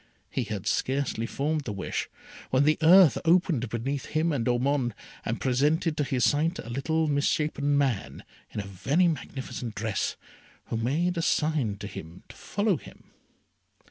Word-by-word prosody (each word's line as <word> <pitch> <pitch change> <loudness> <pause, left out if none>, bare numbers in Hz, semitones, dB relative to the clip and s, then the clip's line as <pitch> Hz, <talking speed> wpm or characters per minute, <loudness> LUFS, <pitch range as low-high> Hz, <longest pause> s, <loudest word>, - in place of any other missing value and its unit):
He 130 - -1
had 105 -3 -5
scarcely 130 -4 0
formed 150 +3 -1
the - - -3
wish, 100 - -3 0.4
when 130 +2 +3
the 155 +3 +3
earth 170 -1 +7
opened 165 - +2
between 130 +5 -2
him 160 +4 -1
and 130 -6 -1
Ormond, 125 -1 +1 0.3
and 115 - -2
presented 150 +5 +1
to 150 - 0
his 135 -3 0
sight 160 +4 +1
a 120 - -7
little 160 +5 0
misshapen 145 0 +1
man 135 -8 -1 0.3
in - - -5
a 100 - -4
very 135 - +1
magnificent 130 -6 -4
dress, 105 -1 -1 0.5
who 115 - -1
made 160 +10 0
a - - +1
sign 150 -11 +1
to 100 - -7
him 90 -3 -9
to - - -12
follow 205 -4 0
him. - - -15
140 Hz, 160 wpm, -27 LUFS, 115-155 Hz, 0.5 s, earth